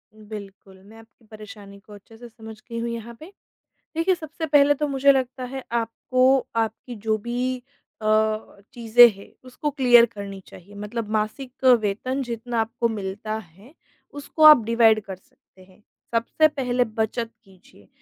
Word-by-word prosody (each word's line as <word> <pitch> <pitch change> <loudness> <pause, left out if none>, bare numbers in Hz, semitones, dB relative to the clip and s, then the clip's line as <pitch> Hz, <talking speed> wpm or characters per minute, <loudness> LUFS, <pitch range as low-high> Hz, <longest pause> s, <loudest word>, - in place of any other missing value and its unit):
बिल्कुल, 200 -3 -11
मैं 215 +3 -16
आपकी 225 +1 -20
परेशानी 205 -2 -12
को 210 +1 -17
अच्छे 205 +2 -16
से 240 +1 -11
समझ 220 -1 -12
गई 230 0 -5
हूँ 235 +1 -3
यहाँ 235 0 -7
पे। 320 +5 -12 0.7
देखिए 345 +3 +2
सबसे 320 -1 -7
पहले 290 -1 +4
तो 300 +1 -2
मुझे 275 0 +4
लगता 260 -1 -2
है 265 0 -6
आपको 255 +3 +1 0.2
आपकी 225 +2 -3
जो 220 0 +2
भी 245 +3 -3 0.5
अ, - - -3 0.7
चीज़ें 240 +1 +7
हैं 195 - -15
उसको 255 +4 -4
क्लियर 245 -4 +5
करनी 200 -3 -9
चाहिए। 200 +3 -15
मतलब 210 +2 -5
मासिक 220 +5 -4 0.2
वेतन 225 +6 -2
जितना 235 -1 -3
आपको 230 +1 -1
मिलता 210 0 -5
है, 200 - -16 0.4
उसको 290 +2 -5
आप 305 -6 +9
डिवाइड 225 -1 +4
कर 190 -1 -7
सकते 185 0 -25
हैं, 185 +3 -24 0.3
सबसे 235 +7 +2
पहले 250 -4 -1
बचत 225 +1 -3
कीजिए। 185 - -22
230 Hz, 155 wpm, -23 LUFS, 210-255 Hz, 0.7 s, आप